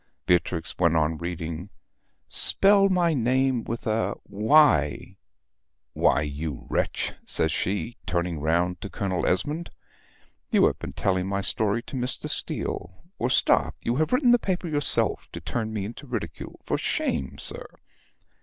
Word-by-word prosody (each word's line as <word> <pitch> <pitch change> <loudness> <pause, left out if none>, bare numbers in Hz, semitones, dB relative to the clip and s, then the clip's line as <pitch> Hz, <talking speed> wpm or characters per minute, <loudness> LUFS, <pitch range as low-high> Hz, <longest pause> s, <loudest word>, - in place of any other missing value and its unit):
Beatrix 85 -2 0
went 85 -2 +3
on 80 0 +1
reading 85 +1 -5 0.6
"Spell 195 0 +4
my 175 -3 +2
name 130 -1 +1
with 115 +1 -5
a 110 0 0
Y 105 - +3 0.8
why, 75 - +3
you 75 -1 -5
wretch," - - -1
says - - +5
she, 100 +5 -2
turning 85 -2 -1
round 85 +4 0
to 100 - -6
Colonel 95 -3 -2
Esmond, 150 - -1 0.8
"you - - +4
have - - 0
been - - -7
telling 95 -1 0
my 100 0 -1
story 110 +3 0
to - - -9
Mr. 125 0 -2
Steele 90 +3 -4 0.2
or 120 - 0
stop - - +2
you 120 +2 0
have 155 +1 +1
written 250 -1 +4
the 245 - +5
paper 185 -4 -2
yourself 145 -2 +2
to - - -5
turn 110 -2 -3
me 105 -3 -3
into 120 +7 -9
ridicule. 120 -4 -6
For - - -1
shame, 65 - -2
sir!" - - -6
105 Hz, 145 wpm, -25 LUFS, 85-135 Hz, 0.8 s, says